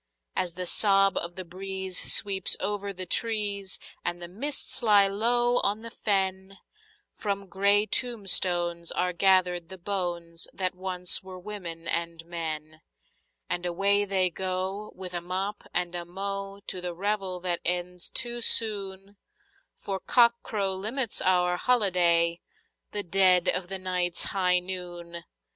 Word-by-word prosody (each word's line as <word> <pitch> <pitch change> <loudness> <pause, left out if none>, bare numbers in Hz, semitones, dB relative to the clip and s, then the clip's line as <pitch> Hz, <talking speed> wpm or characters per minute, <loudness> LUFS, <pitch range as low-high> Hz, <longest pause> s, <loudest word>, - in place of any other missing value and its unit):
As 175 -2 -1
the 180 0 -3
sob 195 +1 +3
of 170 0 -2
the 185 - -6
breeze 190 +1 -2
sweeps 195 -3 +4
over 200 -1 -2
the 185 -1 -6
trees, 205 -1 0 0.3
and 175 - -2
the 175 - -5
mists 260 +13 -1
lie 205 -4 +5
low 240 +4 +2
on 210 +2 0
the 230 - -7
fen, 190 -2 -1 0.6
From 200 -1 -3
grey 200 +2 +2
tombstones 180 -8 +1
are 180 0 0
gathered 180 -2 +2
the 190 - -8
bones 175 -3 -3
that 185 -1 -1
once 180 -1 +1
were 185 -1 -10
women 180 -4 -6
and 170 -1 -1
men, 155 -2 -5 0.7
And 175 - -2
away 200 +3 +1
they 190 -2 +1
go, 190 +3 -3
with 185 -1 -8
a 175 - -3
mop 190 +4 -4
and 175 0 -1
a 175 -1 -4
mow, 195 +2 -6
to 185 - -3
the 175 -1 -4
revel 195 -1 -2
that 175 -1 -1
ends 180 0 0
too 240 -1 -1
soon, 200 -3 +3 0.6
For 195 -1 -5
cockcrow 235 -5 +2
limits 225 +5 -1
our 180 -1 +2
holiday—the 195 - 0
dead 185 0 +4
of 180 - +1
the 195 +1 -2
night's 180 -2 -1
high 180 -2 +2
noon! 175 -2 -5
190 Hz, 140 wpm, -27 LUFS, 175-200 Hz, 0.7 s, lie